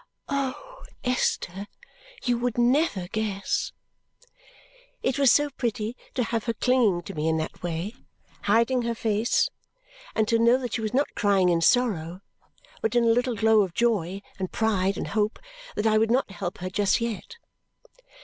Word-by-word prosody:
"Oh, 280 - -4 0.2
Esther, 205 -6 -1 0.6
you 245 -1 +2
would 245 -1 -1
never 240 - +2
guess!" 205 -2 -2 1.3
It 260 +1 0
was 275 -3 +6
so 290 +1 +3
pretty 230 -3 -2 0.2
to 250 - +1
have 230 -1 -2
her 230 -1 -1
clinging 225 -8 +2
to - - -7
me 155 0 -2
in 160 - +1
that 160 0 -4
way, 175 +4 -3 0.5
hiding 230 +5 +3
her 235 0 -2
face, 220 +1 +1 0.7
and 220 -1 +2
to 230 +1 +2
know 235 +2 +5
that 245 -3 -5
she 230 - -1
was 220 +2 -2
not 280 +2 +1
crying 195 -3 +3
in 170 -1 +2
sorrow 185 -5 +2 0.6
but 220 +1 -1
in 240 - +4
a - - +3
little 245 0 0
glow 220 0 +4
of 185 -4 -2
joy, 200 -5 0 0.2
and 185 -1 -3
pride, 200 -3 +1
and - - -4
hope, 215 +1 0 0.4
that 210 - -1
I 215 -1 +4
would 220 0 +2
not 245 -3 +1
help 195 -3 -5
her 185 +1 -4
just 205 +1 +2
yet. 230 - -4
220 Hz, 170 wpm, -26 LUFS, 195-245 Hz, 1.3 s, was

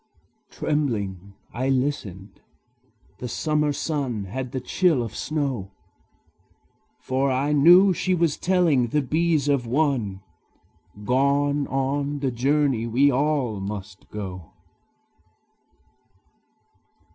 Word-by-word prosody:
Trembling, 100 - -2 0.2
I 130 +3 -1
listened: 120 -8 -3 0.8
the 125 - -5
summer 150 +3 0
sun 140 -7 -2
Had 125 +6 -5
the 130 - -3
chill 155 0 +1
of 115 - -7
snow; 135 -11 -3 1.3
For 135 +1 0
I 135 +3 0
knew 175 +6 +7
she 185 +2 0
was 165 -4 +1
telling 170 -9 +2
the 150 +5 0
bees 155 +1 +1
of 140 -4 +1
one 120 -8 0 0.8
Gone 140 +3 +1
on 140 +2 -1
the 135 -2 -1
journey 135 -1 +1
we 135 +5 +3
all 135 -5 0
must 95 0 -7
go! 95 -5 -7
135 Hz, 100 wpm, -24 LUFS, 115-150 Hz, 1.3 s, knew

